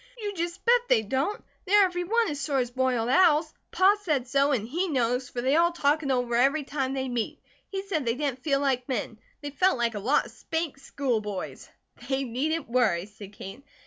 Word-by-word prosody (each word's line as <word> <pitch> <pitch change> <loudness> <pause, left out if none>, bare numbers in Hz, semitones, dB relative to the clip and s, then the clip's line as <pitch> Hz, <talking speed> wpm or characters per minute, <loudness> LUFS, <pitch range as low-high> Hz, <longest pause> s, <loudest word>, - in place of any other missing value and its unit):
"You 415 -3 -4
just 345 +1 -4
bet 485 0 +5
they 220 - +4
don't! 270 - -2 0.2
They 395 +2 +3
are 410 - +8
every 355 -1 -2
one 460 +4 +2
as 290 - -5
sore 280 -1 -1
as 245 -2 0
boiled 255 -2 0
owls. 310 +1 +4 0.2
Pa 385 +2 +4
said 295 -10 -1
so, 275 +2 +2
and 225 -6 0
he 345 +9 -1
knows, 250 -3 0
for 240 - -4
they 265 +4 +2
all 340 +1 +4
talk 305 -2 +1
it 280 - -4
over 245 -2 0
every 275 +6 +3
time 270 -1 -2
they 265 -1 -2
meet. 240 -3 -3 0.3
He 385 -1 -4
said 390 -7 -2
they 230 -1 0
didn't 270 -2 -3
feel 275 -3 +1
like 265 -2 0
men, 225 -3 -3 0.2
they 290 -1 -5
felt 365 +1 +2
like 235 -1 0
a 210 - -4
lot 250 +9 +2
of - - -11
'spanked 320 -4 -4
school 270 -5 -2
boys.'" 205 -3 -6 0.4
"They 270 0 0
needn't 285 +7 -2
worry," 225 -8 +1
said 205 -1 -12
Kate. 200 +6 -10
275 Hz, 220 wpm, -27 LUFS, 245-325 Hz, 0.4 s, are